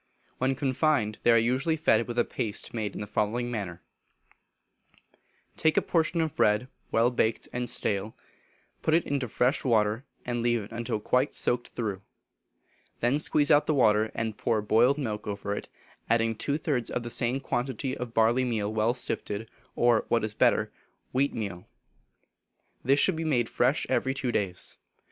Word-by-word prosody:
When 130 +1 +1
confined, 130 -4 0
they - - +2
are 115 - +7
usually 130 +8 +1
fed 115 -7 +2
with 120 0 -5
a 120 - +3
paste 105 -3 -4
made 110 -4 -3
in - - -5
the - - -3
following 120 +4 -1
manner: 90 -7 -5 1.7
Take 160 - +2
a - - +6
portion 165 0 +1
of 160 -2 -2
bread, 105 +4 +2 0.2
well 115 +2 +3
baked 115 -2 0
and 125 -1 -2
stale, 105 -2 -2 0.6
put 160 - +2
it 170 - +2
into 140 -3 -1
fresh 125 +5 +1
water, 110 -1 +2 0.2
and 120 -1 -2
leave 120 -2 +1
it 100 - -12
until 115 -2 -3
quite 125 +6 +1
soaked 120 0 +1
through, 105 -5 -3 1.0
then 125 +5 +2
squeeze 150 -1 +3
out 150 0 +5
the 155 - +2
water 110 -4 +3
and 110 -1 -3
pour 115 -2 +1
boiled 115 +6 +3
milk 110 -7 -4
over 100 0 -3
it, - - -7 0.4
adding 115 -1 +2
two 140 +6 -1
thirds 140 -7 -1
of 125 - -3
the 120 - -4
same 120 +4 +1
quantity 130 0 -2
of 125 -2 -6
barley 115 +3 +3
meal 110 -4 -1
well 110 +3 +1
sifted, 110 -3 -3 0.2
or, 120 -2 +3
what 115 - +1
is 110 -1 -2
better, - - +2 0.4
wheat 135 +2 +1
meal. 100 -6 -5 1.2
This 135 +3 +3
should 190 - +3
be 160 - -3
made 125 -7 +1
fresh - - +1
every 130 0 0
two 130 -2 -1
days. 95 -6 -1
120 Hz, 170 wpm, -28 LUFS, 110-130 Hz, 1.7 s, are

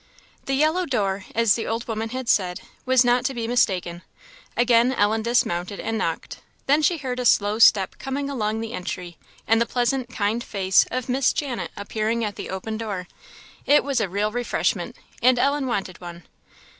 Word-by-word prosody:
The 270 - 0
yellow 315 +5 +2
door, 200 -6 -1
as 230 -3 +4
the 225 - -3
old 230 +1 -3
woman 225 0 -3
had 255 +1 -5
said, 180 -5 +1 0.3
was 260 -1 +4
not 245 0 +3
to 270 - -1
be 230 -1 -3
mistaken. 185 -7 0 0.6
Again 240 +1 +4
Ellen 220 -1 +1
dismounted 200 -5 0
and 225 - -3
knocked; 165 -7 -3 0.3
then 290 +3 +3
she 335 +3 +2
heard 255 -3 -4
a - - -1
slow 210 -1 +3
step 195 -4 +5
coming 275 +1 -3
along 220 -5 -2
the 225 +1 -5
entry, 180 -3 -6 0.3
and 225 +1 +4
the 235 - +1
pleasant, 245 0 0
kind 225 0 -1
face 190 -5 +2
of 255 0 -3
Miss 255 +1 +2
Janet 270 -5 -3
appeared 220 +3 -2
at 205 -2 -3
the - - -7
open 215 +4 -4
door. 200 -5 -4 0.6
It 290 - +5
was 275 -4 0
a 200 - -1
real 205 +3 -1
refreshment, 245 +1 -1 0.3
and 250 +1 +5
Ellen 280 +2 +1
wanted 195 -7 -3
one. 175 -1 -9
230 Hz, 180 wpm, -23 LUFS, 205-255 Hz, 0.6 s, step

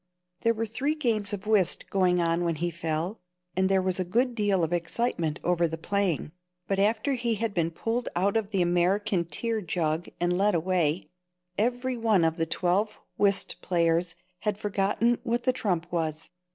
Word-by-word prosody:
There 230 0 +2
were 225 +1 -1
three 275 +8 -1
games 225 -9 0
of 205 -1 -5
whist 205 -5 +2
going 180 -2 +3
on 170 0 +1
when 170 -1 0
he 175 +3 -1
fell, 165 +4 -3 0.4
and 190 +1 +2
there 190 -1 +3
was 185 0 0
a - - +2
good 240 +8 +1
deal 205 -5 +1
of 165 +1 0
excitement 170 -2 -1
over 175 -1 +2
the 160 0 -5
playing, 180 -3 -1 0.4
but 195 -1 0
after 220 +7 +2
he 240 -3 0
had 220 0 -2
been 165 -3 +1
pulled 230 +8 -2
out 195 +4 +1
of 220 -3 0
the 195 -4 +1
American 180 +2 +1
tear 225 +5 -2
jug 165 -2 -1
and 175 0 +1
led 200 +1 +3
away, 170 -1 0 0.4
everyone 235 -3 +1
of 165 +1 +1
the 165 -1 0
twelve 195 +6 0 0.2
whist 200 -1 +2
players 170 -1 +1 0.2
had 210 -2 -1
forgotten 210 +3 +1
what 240 -1 -1
the 255 - +3
trump 180 -9 -1
was. 160 -2 -2
190 Hz, 180 wpm, -27 LUFS, 170-220 Hz, 0.4 s, going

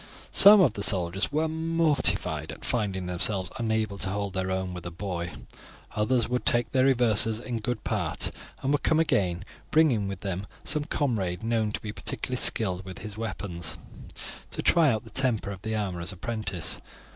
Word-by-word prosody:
Some 205 0 +9
of 135 - +4
the 100 - -5
soldiers 95 +1 +3
were 155 +2 +1
mortified 160 -1 0
at - - -10
finding 100 -6 -1
themselves 90 +2 -1
unable 110 -3 -1
to 95 - -2
hold 100 0 -3
their 95 0 -2
own 95 -1 -2
with 90 -1 -7
a - - -3
boy; 85 0 -4 0.7
others 115 +2 +2
would 125 +1 -2
take 120 0 +2
their 130 -1 +3
reverses 115 -4 +5
in 120 -1 -4
good 115 +1 -3
part - - -1 0.3
and 135 - +1
would 145 - +1
come 160 - +2
again, 95 - +1 0.2
bringing 135 -11 +3
with 95 -2 -6
them 95 0 -4 0.2
some 150 -1 0
comrade 110 - -1
known 115 -2 0
to - - -4
be 105 - -5
particularly 125 +4 -4
skilled 95 -4 +1
with 95 -1 -9
his 105 -2 -6
weapons, 95 -7 -4 0.7
to - - -3
try 155 -9 +4
the 110 +1 -13
temper 120 -6 0
of 95 -2 -8
the 110 +1 -3
armourer's 95 -4 -3
apprentice. 95 -3 -3
105 Hz, 175 wpm, -27 LUFS, 95-125 Hz, 0.7 s, Some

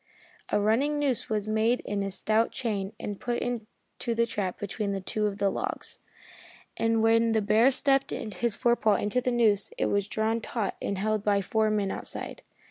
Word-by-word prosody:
A 210 - +2
running 245 +9 +2
noose 280 -5 0
was 215 -1 -1
made 220 +3 +2
in 205 -1 -2
a 195 - -1
stout 215 +4 +1
chain 205 -6 -2
and 205 -1 -5
put 240 -1 -1
into 235 0 -5
the 235 +1 +3
trap 200 -5 -3
between 200 -1 -3
two 210 +3 0
of 200 -1 -4
the 200 -1 +2
logs, - - -4 0.8
and 225 0 +1
when 230 0 +4
the 220 - +3
bear 220 +5 +5
stepped 275 0 +2
his 230 0 -2
forepaw 235 -3 +3
into 210 +5 0
the 250 - 0
noose 220 -5 +2
it - - +1
was 200 0 +1
drawn 220 +2 0
taut 220 -3 -2
and 200 - -2
held 215 +1 0
by 205 -1 +3
four 215 +3 +1
men 205 -2 0
outside. - - -5
220 Hz, 185 wpm, -28 LUFS, 205-235 Hz, 0.8 s, bear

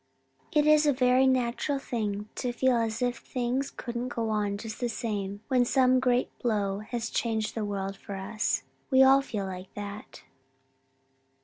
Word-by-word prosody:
'It 300 -1 +3
is 305 0 +5
a 290 - +5
very 255 +1 +4
natural 260 +2 +1
thing 210 -5 -3
to 250 - -2
feel 255 +1 +2
as 230 0 0
if 245 0 0
things 255 +2 -2
couldn't 240 0 -5
go 230 -3 -2
on 205 -1 0
just 220 +1 -7
the 245 - -1
same 205 -3 -3
when 255 -3 +3
some 255 +1 +4
great 250 -1 +1
blow 205 -4 0
has 225 +1 -4
changed 220 -2 -1
the 225 - -2
world 195 -1 -3
for 200 0 -8
us. 210 +3 -1 0.3
We 265 -1 +6
all 270 +1 +7
feel 210 -7 -4
like 185 0 -7
that.' 205 0 -8
235 Hz, 170 wpm, -28 LUFS, 205-255 Hz, 0.3 s, all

